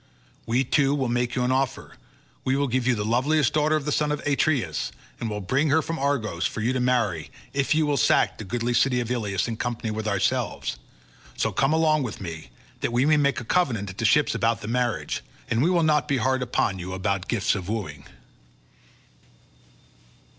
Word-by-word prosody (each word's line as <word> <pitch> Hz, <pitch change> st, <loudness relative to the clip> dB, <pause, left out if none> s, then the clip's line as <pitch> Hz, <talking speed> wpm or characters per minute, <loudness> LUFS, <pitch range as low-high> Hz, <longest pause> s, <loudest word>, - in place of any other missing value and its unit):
We 120 Hz, +3 st, +2 dB
too 140 Hz, +2 st, +2 dB
will 135 Hz, -4 st, -1 dB
make 120 Hz, 0 st, 0 dB
you 125 Hz, -, +1 dB
an 125 Hz, -, +1 dB
offer; 130 Hz, 0 st, -1 dB, 0.5 s
we 130 Hz, -, +1 dB
will 140 Hz, 0 st, +1 dB
give 125 Hz, 0 st, 0 dB
you 125 Hz, -, +3 dB
the 105 Hz, -1 st, -2 dB
loveliest 130 Hz, +5 st, +2 dB
daughter 155 Hz, +1 st, +2 dB
of 150 Hz, -2 st, -2 dB
the 150 Hz, -, -1 dB
son 150 Hz, 0 st, +1 dB
of 150 Hz, -, -1 dB
Atreus, 140 Hz, -, 0 dB, 0.3 s
and 115 Hz, -, -3 dB
will 105 Hz, -1 st, -4 dB
bring 135 Hz, +10 st, +1 dB
her 160 Hz, +2 st, +3 dB
from 165 Hz, 0 st, -4 dB
Argos 115 Hz, -11 st, 0 dB
for -, -, -6 dB
you 120 Hz, +4 st, +1 dB
to 130 Hz, -, 0 dB
marry, 115 Hz, -10 st, 0 dB, 0.2 s
if 140 Hz, +2 st, +1 dB
you 155 Hz, 0 st, +3 dB
will 145 Hz, -1 st, +1 dB
sack -, -, +3 dB
the -, -, -5 dB
goodly 120 Hz, +4 st, -2 dB
city 125 Hz, +1 st, +3 dB
of 120 Hz, 0 st, -3 dB
Ilius 105 Hz, -5 st, -1 dB
in 115 Hz, -1 st, -4 dB
company 120 Hz, -2 st, -3 dB
with 110 Hz, 0 st, -3 dB
ourselves; 100 Hz, -, -1 dB, 0.6 s
so -, -, 0 dB
come 135 Hz, +1 st, +1 dB
along 155 Hz, -1 st, +3 dB
with 120 Hz, -6 st, -4 dB
me, 80 Hz, -8 st, -7 dB, 0.3 s
that -, -, -1 dB
we 120 Hz, +3 st, +2 dB
may 155 Hz, 0 st, +4 dB
make 140 Hz, -3 st, +2 dB
a 120 Hz, -, -8 dB
covenant 115 Hz, -, 0 dB
at 95 Hz, -, -13 dB
the 110 Hz, -, 0 dB
ships 150 Hz, +6 st, +4 dB
about 115 Hz, 0 st, 0 dB
the 105 Hz, -, -6 dB
marriage, 120 Hz, 0 st, -1 dB, 0.3 s
and 115 Hz, -, +2 dB
we 165 Hz, -, +3 dB
will 175 Hz, -2 st, +3 dB
not 150 Hz, -1 st, +2 dB
be 140 Hz, -, +1 dB
hard 130 Hz, +2 st, +1 dB
upon 110 Hz, -6 st, 0 dB
you 90 Hz, +1 st, -5 dB
about 95 Hz, 0 st, -2 dB
gifts 115 Hz, -5 st, +1 dB
of 95 Hz, -2 st, -4 dB
wooing." 75 Hz, -10 st, -4 dB
125 Hz, 210 wpm, -25 LUFS, 110-140 Hz, 0.6 s, may